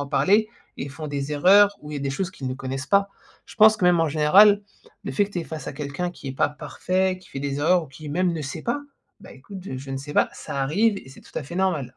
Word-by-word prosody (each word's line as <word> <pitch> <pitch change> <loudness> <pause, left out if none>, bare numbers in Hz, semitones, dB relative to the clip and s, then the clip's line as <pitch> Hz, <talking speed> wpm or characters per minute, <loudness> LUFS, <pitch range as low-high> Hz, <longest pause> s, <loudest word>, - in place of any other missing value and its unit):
à 140 - -4
parler. 205 +9 +3 0.3
Ils 140 - -5
font 155 +3 -7
des 145 0 -3
erreurs 200 +7 +5
ou 150 - -10
il 150 - -5
y - - -3
a - - -7
des 140 0 -2
choses 185 +6 -3
qu'ils 135 -8 -8
ne 130 - -3
connaissent 135 +1 -5
pas. 200 0 +3 0.4
Je - - -13
pense 215 -1 +6
que, 180 - 0
même, 175 -1 +5
en 165 - +2
général, 195 +8 +6 0.4
le - - -4
fait 205 - +2
que 200 - -11
tu 190 - -4
es 170 - -3
face 160 -1 -7
à - - -5
quelqu'un 150 +5 -4
qui 155 -5 -9
est 130 - -4
pas - - +2
parfait, 185 +5 -1
qui 185 - -19
fait - - -6
des 140 0 -3
erreurs 175 +2 +3
ou - - -13
qui, 145 +3 -11
même, 180 +2 +1
ne 155 - -4
sait 145 +3 -5
pas: 240 +5 -1 0.4
«Bah, - - -13
écoute 200 -3 -11
je 130 -9 -5
je 135 +1 -9
ne 135 - -3
sais 145 +2 -7
pas». - - +3
Ça 140 - -5
arrive 200 +9 +2
et - - -14
c'est 135 - -14
tout - - -18
à - - -5
fait 145 +5 -9
normal. 170 -9 -1
155 Hz, 295 wpm, -24 LUFS, 140-190 Hz, 0.4 s, pense